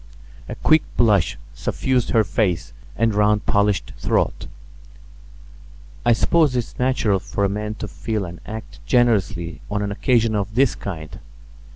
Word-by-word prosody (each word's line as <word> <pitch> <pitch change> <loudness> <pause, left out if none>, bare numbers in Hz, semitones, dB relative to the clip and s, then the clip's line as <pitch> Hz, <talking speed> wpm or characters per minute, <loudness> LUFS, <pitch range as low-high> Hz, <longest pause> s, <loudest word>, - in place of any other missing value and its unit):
A - - -4
quick 155 0 +4 0.2
blush 105 -7 +3 0.2
suffused 130 -3 -1
her 110 - +4
face 95 -3 -1 0.2
and 115 -1 +2
round 105 0 +2
polished 100 -1 +1
throat. - - 0 1.6
"I 120 - +4
suppose 150 +3 +3
it's 120 -2 -3
natural 125 -6 +2
for 100 +2 -2
a - - +1
man 105 +2 -3
to 105 - -6
feel 110 -1 -3
and 85 0 -9
act 105 -1 -8
generously 100 -9 +1
on 105 0 -1
an 100 - -2
occasion 115 +2 +2
of 105 0 -2
this 135 0 +4
kind. 80 -6 -7
105 Hz, 145 wpm, -22 LUFS, 100-120 Hz, 1.6 s, quick